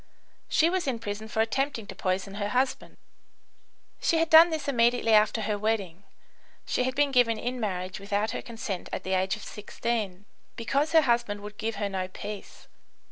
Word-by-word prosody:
She 320 - +4
was 360 -2 -1
in 255 -3 0
prison 215 -1 -5
for 220 0 0
attempting 235 +1 -1
to 195 - -8
poison 190 +1 -2
her 205 - -1
husband. 255 +4 -1 1.0
She 330 - +2
had 325 0 +1
done 325 +2 +9
this 310 -3 -3
immediately 240 -3 +3
after 215 +1 +4
her 210 -1 -1
wedding 200 -4 -2 0.6
(she 250 - 0
had 260 +1 -2
been 290 0 +2
given 245 -3 +3
in 245 +3 -3
marriage 185 -4 -3
without 205 +2 -1
her - - -4
consent 225 -5 -5
at - - -4
the 190 - -2
age 190 +1 +1
of 210 - -11
16) 210 -2 -4 0.3
because 280 +7 0
her 320 - +7
husband 235 -6 0
would 210 0 -10
give 225 0 -2
her 205 - -1
no 190 -2 -3
peace. 205 +2 -9
220 Hz, 185 wpm, -27 LUFS, 205-250 Hz, 1.0 s, done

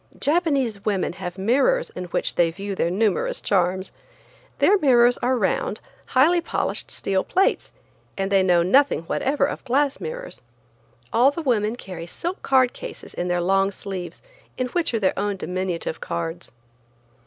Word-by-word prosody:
Japanese 280 - +1
women 200 -5 0
have 180 0 -6
mirrors 275 - +2
in 180 - -6
which 175 - -2
they 170 -1 +3
view 195 +4 -5
their 170 - 0
numerous 200 +1 0
charms. 185 -1 0 0.7
Their 410 0 +4
mirrors 245 -5 +4
are 255 +1 +1
round, 210 0 -1 0.3
highly 330 +7 +4
polished - - -2
steel 190 -1 -1
plates, 380 +2 +1 0.5
and 195 0 -2
they 195 -1 +5
know 175 -2 +3
nothing 270 - +3
whatever 275 - 0
of 290 - -5
glass 275 +2 +1
mirrors. - - -7 0.7
All 245 +4 +5
the 315 +3 -5
women 225 -4 +1
carry 180 -8 -8
silk 345 - -5
card 260 -2 +3
cases - - -9
in 175 - -3
their 175 0 0
long 195 +2 +2
sleeves, 190 -2 -7 0.3
in 255 -1 -1
which 345 +3 0
are 230 - 0
their 190 -3 +2
own 205 -1 -1
diminutive 180 -3 -3
cards. 170 +1 -4
210 Hz, 155 wpm, -23 LUFS, 185-275 Hz, 0.7 s, they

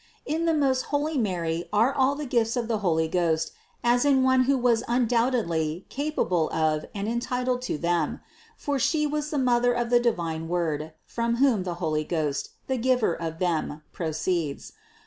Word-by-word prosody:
603. 300 - 0
In 330 +1 -1
the 310 -3 +3
most 260 -1 +2
holy 295 +2 -1
Mary 170 -6 -1
were 225 +6 +3
all 270 +1 +2
the 295 +1 -5
gifts 230 -3 +1
of 235 -2 -1
the 225 -2 0
Holy 160 -5 +1
Ghost 160 -2 0 0.3
as 240 +1 +3
in 275 -2 +4
one 260 0 +4
who 275 +1 +3
was 240 -2 +2
undoubtedly 230 -9 +1
capable 185 - 0
of 155 -1 0
and 200 +1 -3
entitled 250 +2 -1
to 250 - -2
them; 170 -1 0 0.4
for 285 -1 -2
She 300 +3 +2
was 300 0 -2
the 300 - -2
Mother 245 -2 +3
of 240 0 -2
the 240 - +6
divine 165 -9 -1
Word, 160 -3 -2
from 235 0 -1
whom 250 -5 +3
the 175 -2 -3
Holy 155 -3 -1
Ghost, 150 -3 -2 0.2
the 265 - -1
Giver 250 -5 +2
of 165 -1 -5
them, 165 -3 -1
proceeds. 160 -2 -2
230 Hz, 180 wpm, -26 LUFS, 165-255 Hz, 0.4 s, the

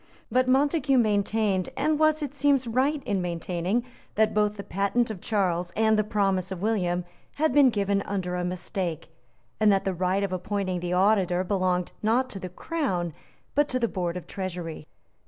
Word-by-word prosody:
But 255 0 +3
Montague 275 +1 +3
maintained, 210 -3 +1
and 305 0 +1
was, 310 0 +3
it 285 -2 -4
seems, 280 -2 +2
right 265 +5 0
in 200 -5 -1
maintaining, 175 +5 -1 0.3
that 220 0 +3
both 210 0 +1
the 200 - -5
patent 200 +6 0
of 195 -5 -8
Charles 180 -5 0
and 220 0 +3
the 215 - +2
promise 195 -3 0
of 190 - -4
William 180 -5 0 0.3
had 310 -3 +1
been 285 -2 +6
given 200 -3 0
under 190 -3 -3
a 180 0 -1
mistake, 180 -2 -3 0.5
and 215 -1 +5
that 195 -1 +1
the 190 - 0
right 185 +2 0
of 195 -2 -2
appointing 185 0 -2
the 175 0 -4
Auditor 185 -2 +3
belonged, 185 -2 0
not 240 +4 +1
to 195 - -6
the 185 - -6
Crown, 180 - -2 0.4
but 290 0 +2
to 255 - 0
the 235 - +1
Board 180 -4 -3
of 180 - -7
Treasury. 175 -5 -6
200 Hz, 180 wpm, -26 LUFS, 180-240 Hz, 0.5 s, been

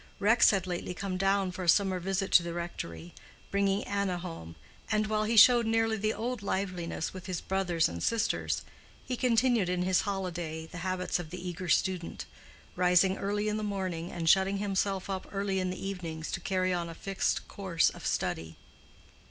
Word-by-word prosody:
Rex 225 +4 +5
had 195 -3 +1
lately 180 0 -4
come 195 -1 -3
down 195 0 +1
for 185 - -7
a 175 - +1
summer 190 +1 +4
visit 195 +2 -2
to - - +7
the 170 0 -5
rectory, 85 - -6 0.4
bringing 200 0 +1
Anna 200 -3 -1
home, 165 - -8 0.4
and 215 0 +2
while 215 0 0
he 225 +1 0
showed 235 +1 +8
nearly 225 0 +2
the 215 0 0
old 240 +1 -3
liveliness 185 -4 -3
with 185 -1 -9
his 180 -3 -2
brothers 185 -4 +1
and 85 0 -6
sisters, 225 -1 0 0.4
he 255 - -2
continued 235 -5 +2
in 180 0 0
his 185 0 +3
holiday 175 -5 -3
the 175 +2 -9
habits 185 0 -1
of 170 -3 -6
the 180 +2 -6
eager 175 0 -5
student, 180 0 0 0.5
rising 180 +1 +4
early 205 +1 -1
in 210 0 0
the - - -3
morning 185 -4 -3
and 170 -2 -4
shutting 190 +3 +4
himself 195 -1 -1
up 190 -1 -4
early 195 -1 -1
in 185 0 -1
the 185 +1 -5
evenings 165 -5 -5
to - - -2
carry 185 -1 0
on 170 -1 -2
a 165 - -8
fixed 195 +2 -1
course 185 -4 +1
of - - -12
study. 80 0 -2
190 Hz, 185 wpm, -30 LUFS, 175-200 Hz, 0.5 s, showed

